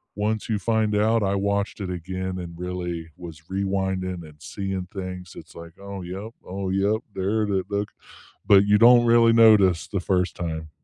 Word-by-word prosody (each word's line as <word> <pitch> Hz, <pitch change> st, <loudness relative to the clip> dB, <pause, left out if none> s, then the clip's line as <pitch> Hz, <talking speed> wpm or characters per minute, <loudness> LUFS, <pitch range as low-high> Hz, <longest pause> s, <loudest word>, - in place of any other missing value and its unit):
once 105 Hz, +1 st, -2 dB
you 110 Hz, -, +1 dB
find 110 Hz, -2 st, 0 dB
out, 110 Hz, +2 st, +2 dB
I 100 Hz, 0 st, 0 dB
watched 100 Hz, +1 st, -1 dB
it 95 Hz, -, -4 dB
again 95 Hz, +1 st, -4 dB
and 85 Hz, -1 st, -8 dB
really 90 Hz, -2 st, -5 dB
was 80 Hz, -3 st, -10 dB
rewinding 95 Hz, -2 st, -2 dB
and 75 Hz, -1 st, -18 dB
seeing 95 Hz, +4 st, -4 dB
things, 90 Hz, -2 st, -7 dB
it's, -, -, -12 dB
like, 85 Hz, 0 st, -11 dB
"Oh, 100 Hz, -1 st, -7 dB
yup, 95 Hz, +6 st, -7 dB
oh, 95 Hz, +1 st, -4 dB
yup, 100 Hz, +4 st, 0 dB
there 105 Hz, +3 st, 0 dB
it 105 Hz, -, -2 dB
is, 95 Hz, -1 st, 0 dB
look," 100 Hz, 0 st, -2 dB, 0.6 s
but 100 Hz, 0 st, +6 dB
you 105 Hz, 0 st, +4 dB
don't 120 Hz, +1 st, +7 dB
really 115 Hz, 0 st, +5 dB
notice 105 Hz, -7 st, +5 dB
the 100 Hz, -, -2 dB
first 90 Hz, 0 st, 0 dB
time. 80 Hz, -2 st, -5 dB
95 Hz, 185 wpm, -24 LUFS, 90-105 Hz, 0.6 s, don't